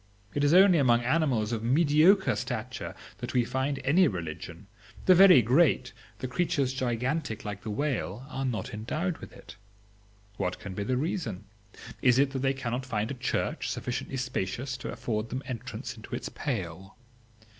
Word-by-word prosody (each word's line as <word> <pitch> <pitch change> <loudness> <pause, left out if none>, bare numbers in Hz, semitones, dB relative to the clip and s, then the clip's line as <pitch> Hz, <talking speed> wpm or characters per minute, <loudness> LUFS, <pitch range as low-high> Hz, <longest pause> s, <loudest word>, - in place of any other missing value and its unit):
It 145 - 0
is 145 - +4
only 185 -1 +7
among 120 -3 +4
animals 125 -6 +1
of 115 -2 -2
mediocre 155 - +4
stature - - -4 0.2
that 120 +1 -5
we 120 -2 +3
find 130 +3 -1
any 165 +7 +5
religion; 85 - -6 0.4
the 185 - +8
very 180 -8 +8
great, 130 +1 +3 0.2
the 130 - -4
creatures 135 -1 0
gigantic 130 0 -2
like 105 -1 -5
the 110 - -6
whale 120 -2 -2
are 135 -2 -4
not 125 -1 -3
endowed 155 - -3
with - - -10
it. - - -13 0.8
What 90 - -2
can 100 -3 -8
be 100 - -3
the 125 +5 0
reason? 145 - -2 0.6
Is 125 -1 +5
it 135 0 +3
that 135 - -3
they 135 +1 +1
cannot 125 -1 -3
find 110 -3 -2
a - - -2
church 125 -1 -2
sufficiently 125 +2 -3
spacious 125 +1 -3
to - - -6
afford 110 -1 -3
them 130 +3 -4
entrance 125 -1 -6
into 115 +2 -7
its - - -5
pale? 95 - -5
125 Hz, 165 wpm, -28 LUFS, 110-145 Hz, 0.8 s, the